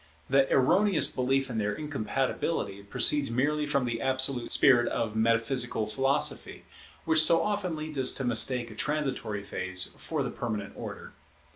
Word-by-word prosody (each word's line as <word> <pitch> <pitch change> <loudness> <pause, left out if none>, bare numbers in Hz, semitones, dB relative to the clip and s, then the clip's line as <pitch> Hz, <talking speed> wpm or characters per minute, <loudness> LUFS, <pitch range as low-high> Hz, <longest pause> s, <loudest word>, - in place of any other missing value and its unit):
The 135 0 +3
erroneous 185 +8 +3
belief 135 +1 0
in 115 -3 -4
their 105 0 -2
incompatibility 135 -5 -3
proceeds 125 +7 +2
merely 145 +5 -1
from 140 -3 0
the 115 -1 -4
absolute 130 -1 +1
spirit 120 -3 +4
of 110 -2 -3
metaphysical 115 +1 0
philosophy, 135 +6 -1 0.4
which 160 -1 +5
so 165 +1 +4
often 205 -5 -2
leads 155 -2 -4
us 130 - +5
to 135 - -2
mistake 120 0 +2
a - - -11
transitory 130 -5 -3
phase 95 -2 -3
for - - -4
the - - -5
permanent 105 -4 -5
order. - - -9
130 Hz, 150 wpm, -27 LUFS, 115-145 Hz, 0.4 s, which